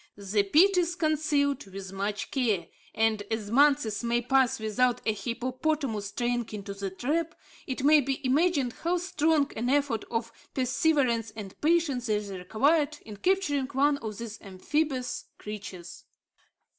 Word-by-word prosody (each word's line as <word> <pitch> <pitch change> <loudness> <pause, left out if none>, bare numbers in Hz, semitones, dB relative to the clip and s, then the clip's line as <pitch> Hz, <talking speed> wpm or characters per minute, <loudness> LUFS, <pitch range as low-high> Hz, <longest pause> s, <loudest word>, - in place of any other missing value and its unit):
The 205 +1 +1
pit 340 - +4
is 345 -1 +1
concealed 300 - +1
with 195 0 -8
much 200 +2 -3
care, 220 - +1 0.3
and 220 -1 +2
as 220 -2 -3
months 255 -5 +3
may 235 0 +1
pass 265 -1 +2
without 235 +3 +1
a 220 - +2
hippopotamus 250 0 -2
straying 240 +2 -2
into 200 -1 -5
the 200 0 -4
trap, 310 - -2 0.3
it 260 -1 -3
may 300 +1 +6
be 270 0 -2
imagined 280 -2 +2
how 345 +2 +1
strong 320 -4 +1
an 240 +3 -1
effort 275 -5 +1
of 230 0 -2 0.2
perseverance 255 -4 +1
and 205 -3 -7
patience 300 -7 +1
is 210 -1 -1
required 280 - +1
in 210 -2 -9
capturing 290 - +1
one 285 +1 +2
of 215 -5 -6
these 230 -2 -7
amphibious 255 +7 -2
creatures. 195 -5 -8
250 Hz, 145 wpm, -28 LUFS, 215-295 Hz, 0.3 s, may